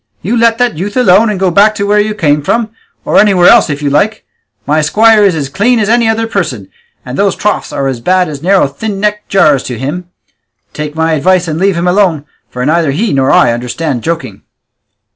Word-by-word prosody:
you 215 +7 -1
let 230 -1 +2
that 245 -9 -1
youth 205 +6 -4
alone, 220 -2 +4
and 205 -3 -3
go 190 -2 +1
back 210 +4 +3
to 200 - -2
where 210 +1 +2
you 210 0 -1
came 150 -6 0
from, 225 +8 -1 0.3
or - - +2
anywhere 195 -4 +3
else 235 -7 +5
if 145 0 -4
you 145 - 0
like; 200 +10 0 0.4
my 155 +2 +1
squire 215 +7 +3
is 195 -4 +2
as 145 -3 -3
clean 220 - 0
as 210 -2 -1
any 235 0 +2
other 225 0 -1
person, 155 - -4 0.4
and - - -6
those - - +1
troughs - - -2
are 140 - -3
as 130 -3 -3
bad 185 +7 +1
as 145 -2 -8
narrow 190 +1 +2
thin 195 +9 -5
necked 210 +1 -2
jars 150 -9 +3
to 125 - -6
him; 160 +8 -5 0.6
take 150 0 -6
my 160 0 0
advice 180 +3 +1
and 160 0 -3
leave 195 0 +1
him 170 +1 -1
alone, 180 -6 +1 0.2
for 125 0 -5
neither 160 +1 +1
he 200 +11 -1
nor 135 -1 +1
I - - +3
understand 125 +3 -4
joking." 165 +3 -5
180 Hz, 220 wpm, -11 LUFS, 150-210 Hz, 0.6 s, else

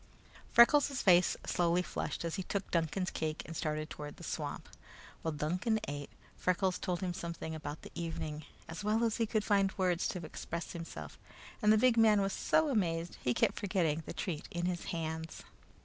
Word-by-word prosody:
Freckles' 275 +3 +6
face 180 -2 +5
slowly 175 +1 +2
flushed 170 - -3
as 165 - -2
he 195 - -2
took 195 +1 -3
Duncan's 170 +2 0
cake 155 0 -2
and 165 - -7
started 155 -1 -2
toward 150 -2 -8
the - - -11
swamp. - - -4 0.5
While 160 - -2
Duncan 180 +10 0
ate, 145 0 -5 0.3
Freckles 185 0 +1
told 180 0 -2
him 180 -2 -1
something 170 -2 -5
about 150 -1 -6
the - - -10
evening, 155 -2 -4 0.2
as 165 +5 -6
well 215 +3 +2
as 225 -2 +1
he 230 - +1
could 215 -1 +1
find 195 -2 +3
words 180 -2 +2
to 175 -4 -4
express 170 +2 -5
himself, 165 -1 -7 0.4
and 210 -1 +5
the 215 - +6
big 240 +1 +4
man 220 -2 +6
was 195 -1 0
so 315 -1 +2
amazed 170 -8 0
he 125 -1 +1
kept - - +2
forgetting 170 -6 +1
the - - -4
treat 165 -6 -4
in 175 0 -2
his 175 -1 -2
hands. 160 -1 -4
175 Hz, 185 wpm, -33 LUFS, 160-200 Hz, 0.5 s, Freckles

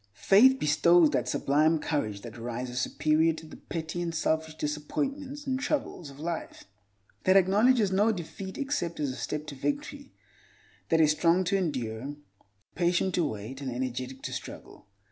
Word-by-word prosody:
Faith 250 - +6
bestows 165 - +4
that - - 0
sublime 155 +4 +2
courage 110 -10 -2
that 115 0 -9
rises 120 +1 -4
superior 155 +4 +2
to 160 - -10
the 155 - -11
petty 165 +1 -5
and 170 -1 -3
selfish 160 0 0
disappointments 275 - -3
and 260 -1 -1
troubles 270 - -2
of 140 0 -13
life, 165 +1 -5 0.6
that 185 +1 +6
acknowledges 205 +3 +4
no 205 +4 +3
defeat 190 0 -6
except 275 - -2
as 145 -3 -1
a - - -7
step 150 +2 -4
to - - -7
victory; 285 - -4 0.8
that 165 - +3
is 155 -1 +5
strong 170 +4 +3
to 180 +2 0
endure, 135 - -2 0.6
patient 180 +1 +1
to 175 - +2
wait, 115 +1 -5
and 135 -2 -3
energetic 130 +1 -4
to - - -4
struggle. - - -9
160 Hz, 160 wpm, -28 LUFS, 140-195 Hz, 0.8 s, Faith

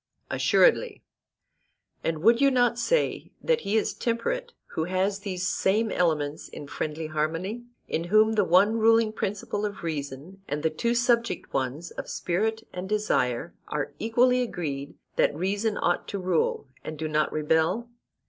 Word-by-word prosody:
Assuredly. 480 -2 +3 1.0
And 160 -1 -2
would 230 +4 +5
you 275 - +6
not 245 -2 +2
say - - 0
that 485 -1 +1
he 205 +3 0
is 220 - 0
temperate 480 - -2 0.2
who 160 - -2
has 190 +3 0
these 185 -2 -3
same 215 +3 +1
elements 155 -4 0
in - - -8
friendly 155 +2 -4
harmony, 165 +9 -2 0.2
in 165 - -2
whom 215 +4 +4
the 210 -2 +3
one 195 +6 +4
ruling 225 0 +4
principle 205 0 -3
of 205 -3 -4
reason, 155 +3 -5
and 145 +1 -3
the 160 - +2
two 235 +10 0
subject 235 -1 +1
ones 135 +5 -2
of - - -7
spirit 220 +5 -1
and 180 +1 -5
desire 175 - 0
are 145 -1 -3
equally 250 +3 +3
agreed 145 - -4 0.2
that - - +3
reason 200 +6 -1
ought 175 - 0
to 200 - -3
rule, 180 -6 0 0.2
and 155 - -6
do 160 +1 -3
not 155 0 +1
rebel? 160 +9 +1
190 Hz, 155 wpm, -27 LUFS, 160-225 Hz, 1.0 s, you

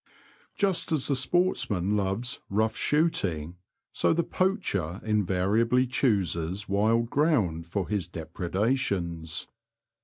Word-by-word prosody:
flUST 195 -5 +1
as 155 -4 +1
the 140 - +2
sportsman 125 - +1
loves 105 +4 -1
'^ - - -27
rough 110 +2 +1
V^ - - -8
shooting," 90 - 0 0.4
so - - +2
the 170 +1 +1
poacher 110 - -1
invariably 105 +4 +2
chooses 100 - 0
wild 110 +4 +1
ground 105 - +1
for 95 +1 -2
his 100 -5 -2
depre 85 +1 -6
dations. 95 -8 -1
105 Hz, 120 wpm, -27 LUFS, 90-130 Hz, 0.4 s, the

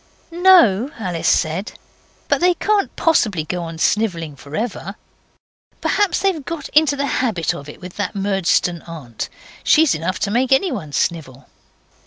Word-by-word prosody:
'No,' 335 - +5
Alice 180 -7 -3
said, 170 +5 0 0.5
'but - - +1
they 360 0 +4
can't 415 +1 0
possibly 215 - +2
go 175 +3 -4
on 165 -1 -6
snivelling 165 -5 0
for 140 +3 -10
ever. 205 -3 -4 0.8
Perhaps 410 -3 +1
they've 370 -7 +1
got 325 -1 -6
into 300 -2 +3
the 280 0 -1 0.2
habit 180 - 0
of 145 +1 -9
it - - -11
with 180 -1 -10
that 205 -2 -3
Murdstone 195 -3 0
aunt. 140 -9 -7 0.3
She's 315 -2 +4
enough 165 +4 -2
to 200 - 0
make 250 +4 +1
anyone 260 - +1
snivel. 135 -3 -3
195 Hz, 150 wpm, -19 LUFS, -, 0.8 s, No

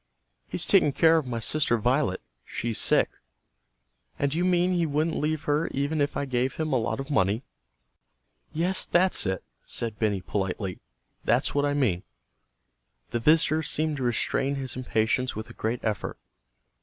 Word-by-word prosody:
"He's - - -1
taking 145 - +4
care 165 +2 +5
of 155 -5 -1
my 120 -2 -3
sister 120 +1 +1
Violet. 125 -3 +1 0.2
She's 115 -2 -3
sick." - - +4 1.1
"And 140 0 0
you 170 +3 0
mean 180 0 +2
he 170 -2 +1
wouldn't 155 +2 0
leave 155 0 -1
her 150 +2 +1
even 145 +3 -1
if 145 - 0
I 140 - -1
gave 130 0 -1
him 155 -2 -2
a 130 - +3
lot 115 +4 -2
of 135 +2 -5
money?" 105 -1 +2 1.1
"Yes, 180 +4 0
that's 180 - +3
it," 95 -1 -2 0.2
said 115 -2 -4
Benny 105 -4 +1
politely. 95 0 -3 0.4
"That's - - +2
what 145 0 +2
I 145 0 0
mean." 110 -11 +1 1.1
The 120 - 0
visitor 155 +4 +4
seemed 155 0 0
to 135 - -3
restrain 130 +3 0
his 135 -2 -4
impatience 125 0 0
with 110 +1 -6
a - - -11
great 115 +2 -2
effort. 110 -2 -2
135 Hz, 165 wpm, -27 LUFS, 115-155 Hz, 1.1 s, care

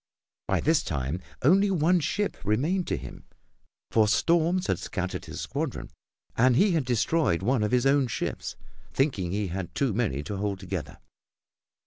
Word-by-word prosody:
By - - +1
this 160 +1 +3
time 70 +5 -3 0.2
only 195 +8 +5
one 175 0 +3
ship 205 +6 -1
remained 150 - 0
to - - -1
him, - - -10 0.7
for 110 -1 +4
storms 170 - +2
had - - 0
scattered 95 -2 -4
his - - -6
squadron - - -4 0.4
and 125 +1 +4
he 200 - +4
had 160 -6 +1
destroyed 120 - +1
one 125 +2 +2
of 105 - +1
his 125 +1 +2
own 135 -1 +4
ships, 115 - -4 0.4
thinking 115 - 0
he 100 0 -1
had 90 0 -5
too 135 -6 +1
many 95 - -1
to 100 +7 -5
hold 100 -1 -2
together. 95 -2 -5
125 Hz, 160 wpm, -27 LUFS, 100-165 Hz, 0.7 s, only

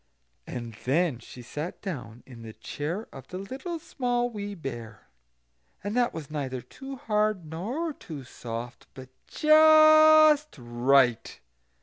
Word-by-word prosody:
And 120 -2 -6
then 145 -1 +1
she 125 +1 -12
sat 150 +7 -6
down 120 - -7
in 120 -3 -13
the 110 -1 -9
chair 165 - -5
of 135 - -11
the 185 - -7
Little 265 - -6
Small 245 -6 -2
Wee 205 -2 -6
Bear, 120 - -8 0.8
and 205 +3 -3
that 245 -1 +2
was 155 -3 -8
neither 135 -4 -3
too 270 - -10
hard 210 -6 -1
nor 235 - -4
too 155 - -9
soft, 120 -1 -8
but 130 -1 -11 0.2
just 310 -1 +6
right. 120 0 +1
170 Hz, 130 wpm, -27 LUFS, -, 0.8 s, just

